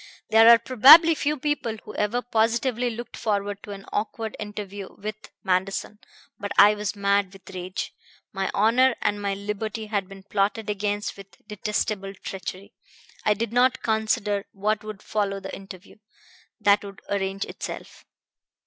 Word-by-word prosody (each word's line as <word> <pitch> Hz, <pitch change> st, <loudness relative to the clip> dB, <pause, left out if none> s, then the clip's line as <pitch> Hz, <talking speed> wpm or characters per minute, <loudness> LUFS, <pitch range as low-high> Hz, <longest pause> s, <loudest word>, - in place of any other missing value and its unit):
There 225 Hz, +1 st, +8 dB
are 235 Hz, -, +10 dB
probably 265 Hz, +8 st, +8 dB
few 300 Hz, 0 st, -1 dB
people 265 Hz, -6 st, -2 dB
who 210 Hz, -, -9 dB
ever 225 Hz, +4 st, -1 dB
positively 235 Hz, +2 st, +1 dB
looked 235 Hz, +1 st, -7 dB
forward 205 Hz, -2 st, -2 dB
to -, -, -12 dB
an 195 Hz, -1 st, -8 dB
awkward 220 Hz, +1 st, -3 dB
interview 205 Hz, -2 st, -7 dB
with 215 Hz, +1 st, -7 dB
Manderson; 190 Hz, +3 st, -1 dB, 0.4 s
but 205 Hz, 0 st, -5 dB
I 205 Hz, +1 st, +8 dB
was 210 Hz, 0 st, -3 dB
mad 200 Hz, -1 st, +1 dB
with 195 Hz, -1 st, -16 dB
rage. 185 Hz, +1 st, -5 dB, 0.4 s
My 195 Hz, -1 st, -1 dB
honor 240 Hz, +5 st, +4 dB
and 205 Hz, 0 st, 0 dB
my 200 Hz, -1 st, -1 dB
liberty 210 Hz, +2 st, -4 dB
had 200 Hz, -3 st, -2 dB
been 195 Hz, -1 st, -12 dB
plotted 210 Hz, +2 st, -1 dB
against 205 Hz, 0 st, -2 dB
with 195 Hz, +1 st, -15 dB
detestable 210 Hz, -1 st, -2 dB
treachery. 190 Hz, 0 st, -7 dB, 0.5 s
I 210 Hz, -, +4 dB
did 230 Hz, +1 st, -3 dB
not 255 Hz, +1 st, +3 dB
consider 215 Hz, -2 st, 0 dB
what 210 Hz, +2 st, -1 dB
would 215 Hz, -1 st, -8 dB
follow 200 Hz, -2 st, -1 dB
the -, -, -7 dB
interview. 195 Hz, 0 st, -12 dB, 0.6 s
That 205 Hz, -1 st, +4 dB
would 200 Hz, -1 st, -10 dB
arrange 195 Hz, 0 st, -2 dB
itself. -, -, -8 dB
210 Hz, 150 wpm, -25 LUFS, 200-225 Hz, 0.6 s, are